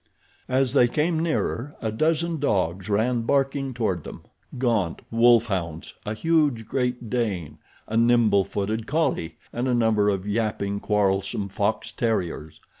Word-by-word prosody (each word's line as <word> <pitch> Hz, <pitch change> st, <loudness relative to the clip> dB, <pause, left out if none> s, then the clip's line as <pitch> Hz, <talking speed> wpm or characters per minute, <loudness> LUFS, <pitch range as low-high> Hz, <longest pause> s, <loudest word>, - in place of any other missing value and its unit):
As 130 Hz, 0 st, +1 dB
they 125 Hz, -4 st, +5 dB
came 155 Hz, +6 st, 0 dB
nearer 150 Hz, -4 st, -1 dB
a 110 Hz, -, -2 dB
dozen 160 Hz, +6 st, 0 dB
dogs 95 Hz, -, 0 dB
ran 115 Hz, +4 st, +1 dB
barking 135 Hz, +2 st, 0 dB
toward 110 Hz, -9 st, -1 dB
them—gaunt 115 Hz, -, -3 dB
wolf 115 Hz, 0 st, +5 dB
hounds, 85 Hz, -7 st, -4 dB
a 105 Hz, -, -2 dB
huge 150 Hz, -5 st, +1 dB
great 125 Hz, -2 st, -2 dB
Dane, 105 Hz, -, -2 dB, 0.3 s
a 110 Hz, -, -1 dB
nimble 115 Hz, -4 st, +4 dB
footed 105 Hz, +3 st, -3 dB
collie 145 Hz, -, -1 dB, 0.2 s
and 120 Hz, +2 st, -1 dB
a 125 Hz, -, +2 dB
number 110 Hz, -3 st, +3 dB
of 95 Hz, -1 st, -1 dB
yapping, 100 Hz, -2 st, -1 dB
quarrelsome 100 Hz, -1 st, 0 dB
fox 105 Hz, +1 st, -1 dB
terriers. 90 Hz, -9 st, -2 dB
115 Hz, 135 wpm, -24 LUFS, 100-125 Hz, 0.3 s, they